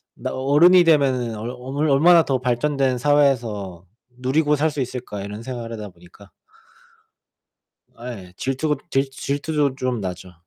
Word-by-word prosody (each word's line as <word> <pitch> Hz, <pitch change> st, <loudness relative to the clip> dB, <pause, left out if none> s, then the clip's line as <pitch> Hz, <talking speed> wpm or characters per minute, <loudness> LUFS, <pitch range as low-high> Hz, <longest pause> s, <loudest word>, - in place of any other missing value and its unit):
나 -, -, -5 dB
'어른이 150 Hz, +7 st, +5 dB
되면 135 Hz, -7 st, +2 dB
얼 110 Hz, +3 st, -5 dB
얼 135 Hz, +5 st, -3 dB
얼마나 165 Hz, +4 st, +6 dB
더 135 Hz, -3 st, -1 dB
발전된 130 Hz, +1 st, 0 dB
사회에서 120 Hz, -10 st, 0 dB, 0.3 s
누리고 150 Hz, +4 st, +1 dB
살 155 Hz, +2 st, +1 dB
수 145 Hz, -2 st, -4 dB
있을까.' 125 Hz, -5 st, -5 dB
이런 105 Hz, +2 st, -7 dB
생각을 120 Hz, -2 st, -6 dB
하다 105 Hz, -2 st, -6 dB
보니까. 90 Hz, +3 st, -18 dB, 1.7 s
아 120 Hz, +2 st, -7 dB
예. 90 Hz, -4 st, -12 dB
질투가 135 Hz, +3 st, -1 dB
질 135 Hz, -2 st, 0 dB
질투도 145 Hz, +1 st, -2 dB
좀 130 Hz, -3 st, -2 dB
나죠. 90 Hz, -1 st, -6 dB
130 Hz, 280 characters per minute, -22 LUFS, 115-145 Hz, 1.7 s, 얼마나